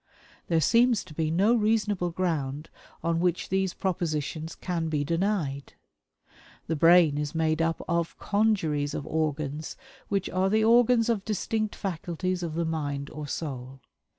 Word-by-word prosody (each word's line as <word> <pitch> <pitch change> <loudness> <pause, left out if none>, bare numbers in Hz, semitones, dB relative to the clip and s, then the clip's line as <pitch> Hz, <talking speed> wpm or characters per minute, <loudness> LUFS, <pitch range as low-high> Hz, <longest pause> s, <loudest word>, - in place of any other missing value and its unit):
There 165 -2 +2
seems 235 - +4
to - - -13
be 155 0 -1
no 195 +8 +3
reasonable 210 -5 +1
ground 155 -5 -2 0.3
on 165 0 +1
which 175 0 0
these 190 -1 0
propositions 160 -3 -2
can 170 -3 -3
be 150 -2 0
denied. 165 -4 -1 0.9
The 160 - -1
brain 165 -2 +5
is 150 +1 -3
made 160 0 +1
up 165 0 0
of 170 -1 -1
a - - -14
congeries 180 -9 +1
of 140 - -4
organs 155 -1 -2 0.3
which 195 -2 -1
are 185 +1 +1
the 215 +2 +3
organs 235 0 +5
of 225 -5 0
distinct 215 +1 -2
faculties 185 0 -3
of 165 -3 -4
the 170 0 0
mind 145 -3 -3
or 150 -1 -6
soul. 135 -3 -5
170 Hz, 150 wpm, -27 LUFS, 155-195 Hz, 0.9 s, brain